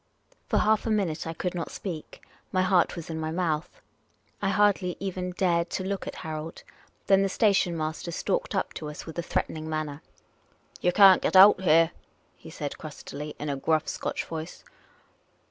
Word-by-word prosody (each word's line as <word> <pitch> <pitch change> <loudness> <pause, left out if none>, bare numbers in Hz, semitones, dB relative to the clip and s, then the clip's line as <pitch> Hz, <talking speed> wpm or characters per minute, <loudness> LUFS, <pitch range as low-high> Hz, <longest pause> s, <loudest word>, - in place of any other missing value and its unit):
For - - +1
half 215 +1 +2
a - - 0
minute 190 -8 0
I 165 - -3
could 180 +1 -3
not 175 -2 -4
speak. 170 -6 -7 0.3
My 185 -1 +2
heart 185 -2 +3
was 170 -1 -7
in 160 - -4
my 155 0 -2
mouth. 165 - -2 0.6
I 195 - +1
hardly 195 -3 +2
even 185 -1 -3
dared 175 -2 +1
to 185 - -3
look 195 0 -3
at - - -5
Harold. 155 +1 -6 0.4
Then 195 0 +5
the 195 - +1
station 195 -4 +2
master 155 +2 -3
stalked - - -2
up - - -1
to 150 - -6
us 150 - -8
with 160 +1 -7
a - - +1
threatening 160 -1 -3
manner. 155 -1 -3 0.4
" - - -24
You 180 - +3
can't 195 0 +7
get - - 0
out 190 0 +8
here," 165 -1 +4 0.4
he - - -13
said, - - -6
crustily, 150 +2 -8
in 150 - -5
a 140 - -1
gruff" 155 +3 0
Scotch - - -3
voice. 160 +1 -7
175 Hz, 185 wpm, -27 LUFS, 160-190 Hz, 0.6 s, out